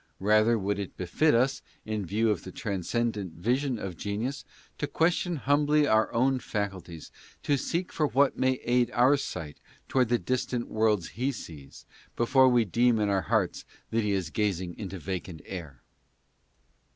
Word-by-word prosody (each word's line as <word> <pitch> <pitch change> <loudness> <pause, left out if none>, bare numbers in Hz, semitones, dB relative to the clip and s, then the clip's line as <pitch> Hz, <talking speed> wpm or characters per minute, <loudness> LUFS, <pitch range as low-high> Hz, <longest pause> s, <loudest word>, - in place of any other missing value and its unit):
Rather 110 +3 +4
would 100 0 -1
it 100 - -6
befit 115 - +2
us, 135 +3 +2 0.2
in 110 -1 -2
view 110 +5 +2
of 100 - -2
the 95 - -8
transcendent 100 -1 -2
vision 125 - 0
of 95 -4 -5
genius, 110 - -3 0.4
to 145 - -1
question 175 +2 +1
humbly 145 +1 +2
our 110 -5 +3
own 130 +2 +2
faculties, 95 -8 -5 0.4
or 145 - +4
seek 170 +6 -2
for 150 - +1
what 140 0 +3
may 130 0 +2
aid 120 0 +2
our 125 +4 +5
sight 80 - -5 0.3
toward 125 -3 +2
the 120 - +3
distant 125 -1 -2
worlds 110 -5 +1
he 130 +5 -1
sees, 75 - -10 0.3
before 130 +2 +4
we 120 -2 +3
deem 120 +4 +3
in 105 -1 +1
our 100 -1 +2
hearts 80 - 0 0.3
that 115 - +2
he 105 -1 0
is 95 -5 -1
gazing 95 -4 -1
into 95 -3 -5
vacant 90 -2 -5
air. 80 -9 -8
110 Hz, 165 wpm, -28 LUFS, 95-130 Hz, 0.4 s, our